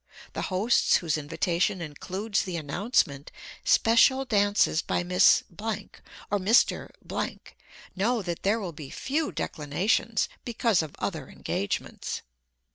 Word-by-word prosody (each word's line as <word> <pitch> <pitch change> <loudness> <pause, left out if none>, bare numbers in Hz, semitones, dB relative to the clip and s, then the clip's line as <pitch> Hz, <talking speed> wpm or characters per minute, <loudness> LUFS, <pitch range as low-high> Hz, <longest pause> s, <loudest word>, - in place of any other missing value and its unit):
The - - -3
hosts 200 +6 +3
whose 165 -4 +1
invitation 170 +5 0
includes 185 +7 -3
the 180 -3 -4
announcement 150 - 0 0.3
"special 260 +4 +4
dances 205 -7 +2
by - - -1
Miss 180 +1 +5 0.2
or 205 -1 -5
Mr. 210 +6 +3 0.8
" - - -20
know 220 +3 +1
that 175 -2 -4
there 210 +4 +2
will 185 -6 -5
be 150 -2 -9
few 295 +3 -2
declinations 185 +8 0 0.2
because 230 -5 +1
of 155 -2 -7
other - - -4
engagements. 100 - -4
195 Hz, 120 wpm, -27 LUFS, 165-225 Hz, 0.8 s, Miss